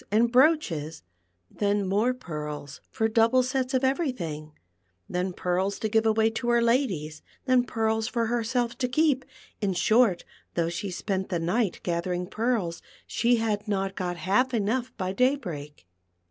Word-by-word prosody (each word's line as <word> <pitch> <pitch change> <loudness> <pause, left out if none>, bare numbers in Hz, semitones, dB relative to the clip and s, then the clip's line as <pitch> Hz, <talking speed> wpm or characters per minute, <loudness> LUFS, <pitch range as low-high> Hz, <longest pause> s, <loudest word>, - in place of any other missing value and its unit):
19 215 - +4
and 235 - +1
brooches, 245 - +2 0.5
then 205 -1 0
more 210 +6 +2
pearls 150 - -6
for 220 - 0
double 230 +3 +4
sets 260 +1 -1
of 260 - +1
every 270 +3 +1
thing, 155 -8 -6 0.6
then 180 +1 -2
pearls 185 +2 -1
to 220 - -2
give 220 +1 +2
away 220 0 +3
to 225 +2 -2
her 240 0 +4
ladies, 220 - 0 0.2
then 255 -2 +4
pearls 220 -2 0
for 235 -1 0
herself 235 +1 -1
to 250 0 -1
keep; 285 0 +2 0.4
in 200 -2 +1
short, 215 +1 +3 0.3
though 170 -1 +1
she 180 +4 -4
spent 190 +1 -3
the 180 - 0
night 180 +4 0
gathering 175 +1 -1
pearls, 215 -4 -1 0.2
she 240 +1 +2
had 215 -2 -1
not 195 -1 -1
got 175 -2 -3
half 245 +9 +1
enough 235 +4 0
by 185 -2 -2
da\ 255 +6 +3
break. 150 - -8
220 Hz, 160 wpm, -27 LUFS, 180-245 Hz, 0.6 s, 19